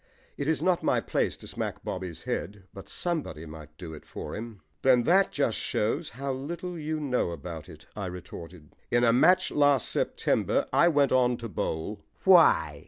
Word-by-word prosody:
It 140 Hz, -, -3 dB
is 160 Hz, -, +1 dB
not 185 Hz, -2 st, +2 dB
my -, -, +2 dB
place -, -, -1 dB
to -, -, -11 dB
smack -, -, -5 dB
Bobby's 90 Hz, -3 st, -5 dB
head, 100 Hz, +2 st, -4 dB
but 95 Hz, -, -10 dB
somebody 150 Hz, -, -2 dB
might 75 Hz, -1 st, -11 dB
do 85 Hz, -3 st, -8 dB
it 75 Hz, -, -10 dB
for -, -, -7 dB
him. 110 Hz, -2 st, -8 dB, 0.2 s
"Then 125 Hz, -2 st, +5 dB
that 190 Hz, +7 st, +4 dB
just 130 Hz, -6 st, 0 dB
shows 145 Hz, +9 st, -1 dB
how 135 Hz, 0 st, -2 dB
little 170 Hz, +7 st, -5 dB
you 155 Hz, -1 st, -3 dB
know 130 Hz, -9 st, 0 dB
about 85 Hz, 0 st, -7 dB
it," 80 Hz, -2 st, -13 dB
I 100 Hz, -3 st, -4 dB
retorted. 85 Hz, -3 st, -10 dB
"In 120 Hz, 0 st, +2 dB
a 115 Hz, -1 st, +5 dB
match 185 Hz, +9 st, +4 dB
last 145 Hz, -4 st, +3 dB
September -, -, 0 dB
I 170 Hz, -, +5 dB
went 145 Hz, -4 st, +3 dB
on 125 Hz, -1 st, +3 dB
to 115 Hz, -, -6 dB
bowl 100 Hz, +2 st, -3 dB
" -, -, -36 dB
"Why?" 80 Hz, -, +5 dB
120 Hz, 185 wpm, -28 LUFS, -, 0.2 s, Then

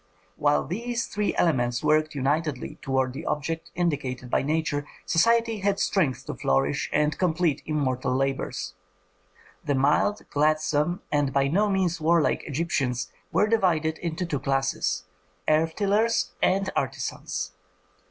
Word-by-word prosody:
While 145 Hz, 0 st, +2 dB
these 235 Hz, +7 st, -2 dB
three 210 Hz, 0 st, -1 dB
elements 120 Hz, -7 st, +1 dB
worked 155 Hz, 0 st, +2 dB
unitedly 145 Hz, 0 st, -1 dB
toward 130 Hz, -1 st, 0 dB
the 145 Hz, +4 st, -6 dB
objects 160 Hz, +2 st, -2 dB
indicated 135 Hz, -8 st, -2 dB
by -, -, +3 dB
nature, 145 Hz, 0 st, -1 dB, 0.2 s
society 230 Hz, +5 st, +3 dB
had 200 Hz, 0 st, +1 dB
strength 155 Hz, -10 st, +1 dB
to -, -, -4 dB
flourish 70 Hz, +1 st, 0 dB
and 150 Hz, +1 st, +2 dB
complete 170 Hz, -4 st, +1 dB
immortal 130 Hz, -4 st, 0 dB
labors. 130 Hz, -7 st, -2 dB, 0.9 s
The 145 Hz, -, 0 dB
mild, 145 Hz, +10 st, +2 dB
gladsome, 155 Hz, +3 st, +1 dB
and 145 Hz, -2 st, +1 dB
by 140 Hz, 0 st, +2 dB
no 205 Hz, +7 st, +2 dB
means 180 Hz, -4 st, 0 dB
warlike 165 Hz, 0 st, +2 dB
Egyptians 140 Hz, -5 st, -1 dB, 0.2 s
were 210 Hz, -, +3 dB
divided 170 Hz, -8 st, +1 dB
into 170 Hz, +1 st, -3 dB
two 150 Hz, -5 st, -2 dB
classes, 135 Hz, 0 st, 0 dB, 0.4 s
earth 160 Hz, +1 st, +2 dB
tillers 215 Hz, +3 st, +1 dB
and 190 Hz, +1 st, +2 dB
artisans. 135 Hz, -8 st, -3 dB
155 Hz, 130 wpm, -26 LUFS, 135-175 Hz, 0.9 s, by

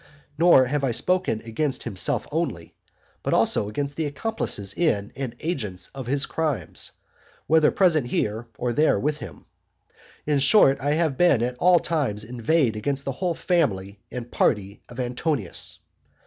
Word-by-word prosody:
Nor 165 Hz, -4 st, +6 dB
have 140 Hz, +2 st, -1 dB
I 135 Hz, -, +2 dB
spoken 180 Hz, -1 st, 0 dB
against 130 Hz, +5 st, -2 dB
himself 95 Hz, -3 st, -1 dB
only, -, -, -3 dB, 0.5 s
but -, -, 0 dB
also 105 Hz, -, +2 dB
against 140 Hz, +6 st, -3 dB
the 160 Hz, -2 st, 0 dB
accomplices 145 Hz, -, -2 dB
in 105 Hz, -12 st, 0 dB
and 130 Hz, -4 st, -5 dB
agents 110 Hz, -, -3 dB
of 135 Hz, -3 st, -7 dB
his 140 Hz, +2 st, +1 dB
crimes, 155 Hz, -6 st, -3 dB, 0.5 s
whether 160 Hz, -1 st, +4 dB
present 160 Hz, -9 st, +2 dB
here, 110 Hz, 0 st, -2 dB
or 120 Hz, -1 st, -1 dB
there 150 Hz, -5 st, +3 dB
with 150 Hz, +5 st, -1 dB
him. 120 Hz, -, -10 dB, 0.8 s
In 145 Hz, -2 st, +2 dB
short, 140 Hz, -1 st, +5 dB
I 145 Hz, +2 st, +1 dB
have 155 Hz, -3 st, 0 dB
at 125 Hz, -8 st, +3 dB
all 180 Hz, 0 st, +6 dB
times 140 Hz, -12 st, -1 dB
inveighed 120 Hz, +2 st, +1 dB
against 140 Hz, +6 st, -2 dB
the 135 Hz, -, -1 dB
whole 175 Hz, +5 st, -2 dB
family 105 Hz, -, 0 dB
and 120 Hz, -1 st, -6 dB
party 100 Hz, -2 st, 0 dB
of 120 Hz, +1 st, -10 dB
Antonius. 125 Hz, -, -2 dB
135 Hz, 150 wpm, -24 LUFS, 115-155 Hz, 0.8 s, Nor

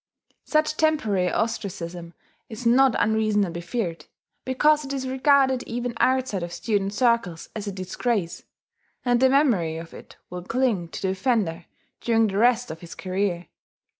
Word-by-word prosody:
Such 305 Hz, 0 st, +1 dB
temporary 220 Hz, -, +1 dB
ostracism 180 Hz, -6 st, -3 dB, 0.3 s
is 225 Hz, +2 st, -8 dB
not 250 Hz, +1 st, +5 dB
unreasonably 210 Hz, -5 st, +1 dB
feared, 170 Hz, -6 st, -4 dB, 0.4 s
because 295 Hz, +4 st, +3 dB
it 275 Hz, -, -6 dB
is 265 Hz, -1 st, -3 dB
regarded 265 Hz, -1 st, +3 dB
even 240 Hz, +1 st, -3 dB
outside 255 Hz, -7 st, +1 dB
of 170 Hz, 0 st, -5 dB
student 200 Hz, 0 st, -1 dB
circles 230 Hz, -9 st, +1 dB
as 210 Hz, -1 st, -5 dB
a -, -, -2 dB
disgrace; 185 Hz, 0 st, -2 dB, 0.6 s
and 245 Hz, -1 st, +3 dB
the 260 Hz, +1 st, +5 dB
memory 225 Hz, -, +2 dB
of 165 Hz, 0 st, -9 dB
it -, -, -13 dB, 0.2 s
will 180 Hz, 0 st, -5 dB
cling 220 Hz, -3 st, 0 dB
to 165 Hz, -, -8 dB
the 190 Hz, -, +1 dB
offender 190 Hz, -4 st, 0 dB, 0.3 s
during 225 Hz, -1 st, +2 dB
the 200 Hz, -1 st, -1 dB
rest 245 Hz, +1 st, +3 dB
of 160 Hz, -, -8 dB
his 170 Hz, 0 st, -10 dB
career. 185 Hz, -2 st, -2 dB
220 Hz, 150 wpm, -24 LUFS, 180-255 Hz, 0.6 s, not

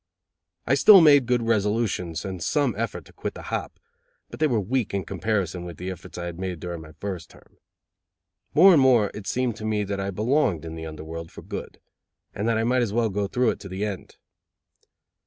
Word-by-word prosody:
I 130 Hz, -, +2 dB
still 190 Hz, +9 st, +8 dB
made 145 Hz, -6 st, +6 dB
good 125 Hz, -1 st, +1 dB
resolutions, 105 Hz, -6 st, 0 dB
and 95 Hz, -3 st, -5 dB
some 140 Hz, -, +1 dB
effort 100 Hz, -7 st, -4 dB
to -, -, -18 dB
quit -, -, -5 dB
the -, -, -9 dB
hop, -, -, -4 dB, 0.5 s
but -, -, -9 dB
they 155 Hz, -, +3 dB
were 120 Hz, -6 st, +1 dB
weak 110 Hz, +1 st, -1 dB
in 95 Hz, -, -2 dB
comparison 95 Hz, -3 st, -2 dB
with 85 Hz, -3 st, -8 dB
the 90 Hz, +1 st, -4 dB
efforts 90 Hz, 0 st, -10 dB
I 85 Hz, -, -4 dB
had 85 Hz, 0 st, -6 dB
made 90 Hz, -3 st, -4 dB
during 85 Hz, 0 st, -6 dB
my 80 Hz, 0 st, -13 dB
first 90 Hz, +1 st, -6 dB
term. -, -, -21 dB, 1.0 s
More 185 Hz, +5 st, +8 dB
and 150 Hz, -, +5 dB
more 120 Hz, -6 st, +4 dB
it 105 Hz, -2 st, -8 dB
seemed 125 Hz, -3 st, -1 dB
to 110 Hz, -, -9 dB
me 110 Hz, -1 st, 0 dB
that 100 Hz, 0 st, -3 dB
I 95 Hz, 0 st, -2 dB
belonged 105 Hz, -, +1 dB
in 80 Hz, -, -6 dB
the 80 Hz, 0 st, -6 dB
under 80 Hz, -1 st, -8 dB
world 80 Hz, +1 st, -7 dB
for -, -, -11 dB
good, -, -, -7 dB, 0.5 s
and 105 Hz, -, -2 dB
that 115 Hz, -1 st, +2 dB
I 110 Hz, -, +1 dB
might 125 Hz, +2 st, +2 dB
as 115 Hz, -4 st, 0 dB
well 115 Hz, +1 st, +1 dB
go 100 Hz, +1 st, -1 dB
through 125 Hz, +3 st, +1 dB
it -, -, -7 dB
to 100 Hz, -, -9 dB
the 95 Hz, +3 st, -3 dB
end. 100 Hz, -4 st, -7 dB
105 Hz, 220 wpm, -25 LUFS, 90-120 Hz, 1.0 s, still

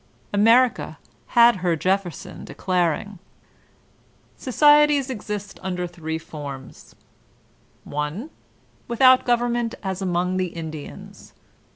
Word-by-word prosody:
America 230 Hz, +5 st, +3 dB, 0.4 s
had 235 Hz, -2 st, +7 dB
her 175 Hz, -2 st, 0 dB
Jefferson 185 Hz, 0 st, -2 dB
declaring: 180 Hz, +2 st, -2 dB, 1.2 s
''Societies 295 Hz, 0 st, +4 dB
exist 205 Hz, -4 st, -6 dB
under 180 Hz, -1 st, -3 dB
three 160 Hz, -2 st, -5 dB
forms: 145 Hz, -5 st, -10 dB, 0.9 s
i. 150 Hz, -, -4 dB, 0.6 s
Without 255 Hz, +2 st, +5 dB
gov 240 Hz, -1 st, +3 dB
ernment 240 Hz, -1 st, -1 dB
as 190 Hz, -1 st, -3 dB
among 180 Hz, 0 st, 0 dB
the 185 Hz, -1 st, 0 dB
Indians. 155 Hz, -3 st, -9 dB
190 Hz, 90 wpm, -23 LUFS, 170-240 Hz, 1.2 s, had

